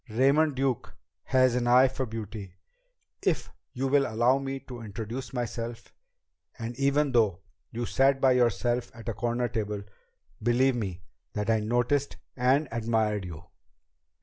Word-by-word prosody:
Raymond 140 +6 +3
Duke 130 -2 -1 0.3
has 130 -2 +4
an 120 -1 0
eye 125 +2 +7
for 130 0 -3
beauty 105 -4 -7 0.7
if - - 0 0.2
you 135 0 -2
will 140 +1 +3
allow 120 +4 +3
me 135 0 -4
to 125 -2 -9
introduce 115 +4 -6
myself 120 -1 -5 0.6
and 120 0 -5
even 140 +1 +2
though 110 -8 +2 0.3
you 120 +1 -3
sat 135 +3 +3
by 135 -1 +5
yourself 120 0 +1
at 115 0 -7
a - - -1
corner 120 +2 -1
table, 105 -2 -3 0.6
believe 125 +3 +3
me 95 -6 -4 0.3
that 105 +2 0
I 110 - +3
noticed 120 +6 0 0.2
and 135 +4 +2
admired 110 -3 0
you." 85 -2 -8
120 Hz, 145 wpm, -28 LUFS, 110-130 Hz, 0.7 s, eye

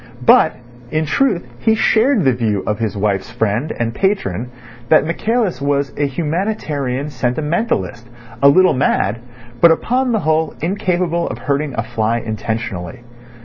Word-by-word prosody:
But, - - +5 0.3
in 155 +2 0
truth, 190 - +1
he 220 - +2
shared 225 0 +3
the 130 -2 +3
view 110 -5 -1
of 105 0 -2
his 110 -3 -2
wife's 100 -1 -1
friend 115 +7 -1
and 115 -1 -2
patron 125 - -1 0.4
that - - +5
Michaelis 215 +2 -1
was 140 0 0
a 145 0 0
humanitarian 150 -4 -2
sentimentalist, 125 - -2 0.3
a 140 - +7
little 185 +6 +5
mad, 115 -4 +1 0.4
but 170 - +8
upon 250 +10 +1
the 220 - +1
whole 160 0 0
incapable 175 -1 -1
of - - -5
hurting 140 +3 -2
a 115 - -1
fly 110 +1 -1
intentionally. 110 -4 -4
145 Hz, 145 wpm, -18 LUFS, 115-175 Hz, 0.4 s, but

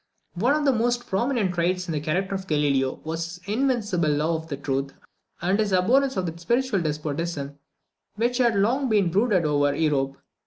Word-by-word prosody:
One 240 +11 +2
of 300 -1 0
the 275 - +5
most 240 +1 0
prominent 220 -2 0
traits 180 +1 0
in - - -3
the 155 - -1
character 180 +6 -1
of 190 -1 -4
Galileo 140 -4 +1
was 165 +1 -3
his 175 +2 -8
invincible 220 - +1
love 160 +2 -1
of 140 0 -4
truth, 135 0 -2 0.5
and 190 +4 +2
his 210 -2 +1
abhorrence 255 +8 +3
of 185 - 0
that 165 0 -5
spiritual 235 +2 0
despotism 150 -1 -3 0.6
which 240 +4 0
had 240 -2 +4
so 200 - +1
long 260 +6 +1 0.2
brooded 200 -3 +2
over 145 -1 +2
Europe. 140 -3 0
180 Hz, 180 wpm, -25 LUFS, 150-230 Hz, 0.6 s, the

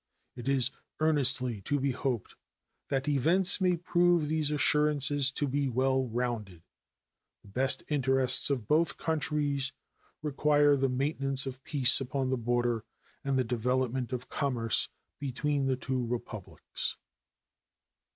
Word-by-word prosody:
It 125 +1 -5
is 135 -2 +3 0.3
earnestly 130 -7 +1
to 145 +9 -2
be 135 0 0
hoped 125 -3 -4 0.6
that 135 -1 -2
events 165 +8 +3
may 180 -2 +2
prove 175 -2 +1
these 155 -2 0
assurances 145 -2 +3
to 145 - -1
be 140 0 -1
well 130 +1 0
rounded. 110 -7 -4 0.8
The 100 - -17
best 130 +6 +2
interests 135 -3 +3
of 125 -7 -2
both 160 +2 +1
countries 145 -3 0 0.5
require 145 0 +2
the 135 -1 0
maintenance 135 +1 +1
of 135 0 -7
peace 135 -3 +4
upon 130 0 -2
the - - +1
border 120 -1 -1 0.4
and 140 -2 -1
the 130 - +2
development 125 +1 -2
of 125 -1 -5
commerce 125 -6 0 0.3
between 140 +1 -2
the 130 -1 0
two 130 -1 -3
Republics. 115 -4 -5
135 Hz, 130 wpm, -29 LUFS, 125-145 Hz, 0.8 s, peace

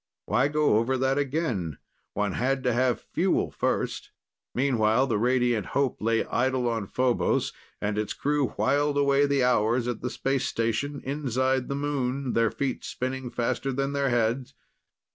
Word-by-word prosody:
Why 135 - +2
go 150 -6 +3
over 130 +3 0
that 135 +2 +1
again? 125 - -1 0.4
One 105 -1 0
had 130 +5 0
to 125 - +2
have 125 0 +2
fuel - - +1
first. - - -2 0.5
Meanwhile, 120 -2 +3
the 115 -6 0
Radiant 120 -4 +1
Hope 140 -3 0
lay 115 +1 +1
idle 130 -1 0
on 115 -4 -1
Phobos 125 +1 +1 0.3
and 105 +1 -1
its 105 - -2
crew 145 -1 0
whiled 145 +2 +2
away 140 0 +3
the 140 -2 +2
hours 120 0 +2
at 120 - -3
the 125 - -2
space 135 +1 -1
station 115 +5 -1
inside 130 -2 0
the 140 - -2
moon, 140 -2 -1
their 115 -1 +3
feet 135 +1 -3
spinning 130 0 -4
faster 120 +3 -1
than 135 +2 -1
their 140 -1 +1
heads 120 +3 0
130 Hz, 160 wpm, -27 LUFS, 115-140 Hz, 0.5 s, go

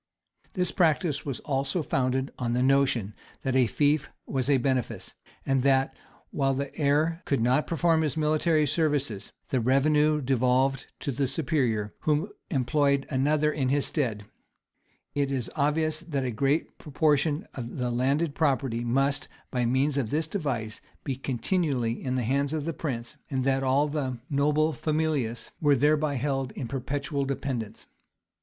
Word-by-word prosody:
This 180 -2 0
practice 155 -4 +1
was 135 - -3
also 140 +4 -1
founded 130 0 0
on 120 -1 -1
the 125 +1 +2
notion 130 -6 +2 0.3
that 130 -1 0
a 130 -2 +4
fief 145 +5 +1 0.2
was 135 0 -1
a 140 - +5
benefice, 130 -1 -1 0.3
and 135 -1 +2
that, 135 0 +2 0.4
while 135 -2 +1
the 140 0 -4
heir 155 +3 +1
could 140 - +1
not 125 +6 +2
perform 165 -1 +2
his 155 -1 -1
military 155 0 +2
services, 145 - 0 0.2
the 130 - +1
revenue 150 +5 +3
devolved 130 0 +1
to 140 - -2
the 135 +1 0
superior, 130 -8 0
who 155 +7 0 0.2
employed 140 -1 +2
another 150 +3 +2
in 130 -3 0
his 140 +1 +1
stead. 115 -9 -1 0.9
It 140 -1 0
is 130 -4 -2
obvious 155 +1 +1
that 140 -6 -3
a 125 - -1
great 140 +6 0
proportion 150 +3 +1
of 120 -2 -6
the 125 -2 -1
landed 140 +6 +1
property 135 -6 0
must, 135 +4 +1 0.2
by 125 -2 0
means 135 +3 +2
of 120 -6 -2
this 155 +4 0
device, 135 - -3 0.2
be 135 -3 -2
continually 130 -2 -1
in 130 -1 -1
the 125 - 0
hands 140 +5 0
of 155 -2 -2
the 165 - -2
prince, 120 -7 -5
and 130 -2 -1
that 135 0 +2
all 135 +3 +2
the 140 -4 -2
noble 150 +2 +2
familius 150 -8 -1
were 145 -2 +5
thereby 150 +2 +2
held 135 -1 -1
in 130 - -5
perpetual 140 +2 -2
dependence. 135 -5 -4
140 Hz, 155 wpm, -27 LUFS, 130-150 Hz, 0.9 s, a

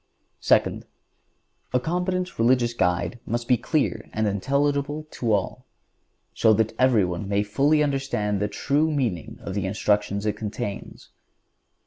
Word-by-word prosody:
Second—A 125 - -2
competent 180 +4 -2
religious 120 0 +3
guide 90 +2 0
must 120 +1 -3
be 125 - +5
clear 120 -4 -1
and 110 0 0
intelligible 140 +8 0
to 115 -3 -2
all, 100 -3 -1 0.7
so 110 - +4
that 110 +1 +1
everyone 100 -7 +2
may 100 0 +2
fully 140 +9 +2
understand 135 -8 -1
the 105 - 0
true 145 +8 0
meaning 120 - -2
of 95 - -6
the 100 -1 -1
instructions 105 0 0
it 105 -1 0
contains. 105 0 -6
115 Hz, 125 wpm, -24 LUFS, 105-140 Hz, 0.7 s, be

